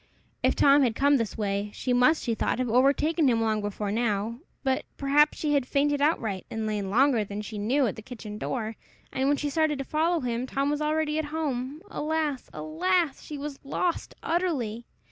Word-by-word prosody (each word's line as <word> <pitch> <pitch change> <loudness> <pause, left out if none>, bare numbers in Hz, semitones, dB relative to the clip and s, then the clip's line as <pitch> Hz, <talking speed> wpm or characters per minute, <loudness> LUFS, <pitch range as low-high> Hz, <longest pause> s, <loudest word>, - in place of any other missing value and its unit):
If - - +2
Tom 285 +1 +6
had 240 -4 +2
come 285 +2 +4
this 230 -4 -3
way, 200 -1 -1
she 250 - -1
must, 250 +6 +4
she 235 - 0
thought, - - 0
have 255 0 -1
overtaken 280 +5 +3
him 235 -3 +3
long 220 -1 +1
before 205 0 -3
now! 225 0 -1 0.2
But, 265 -1 +1
perhaps, 295 +2 +3
she 300 -1 0
had 275 -3 +1
fainted 285 +1 +1
outright, 225 - 0
and 225 -1 -3
lain 210 -2 -2
longer 245 +1 +3
than 205 +1 -5
she 210 0 -6
knew 255 +7 +2
at 220 - -1
the - - -8
kitchen 215 -3 -8
door; 225 -3 -3 0.4
and 265 +1 0
when 285 0 +3
she 290 0 -2
started 310 -1 +1
to 275 - -4
follow 325 +3 +1
him, 245 0 -2
Tom 275 +2 0
was 295 0 -1
already 305 0 0
at 315 - -1
home! 295 -1 -3
Alas, 305 -3 -2
alas! 335 -1 0
she 300 - -7
was 285 0 -6
lost 335 +5 -2
utterly! 270 -11 -1
270 Hz, 200 wpm, -27 LUFS, 225-300 Hz, 0.4 s, Tom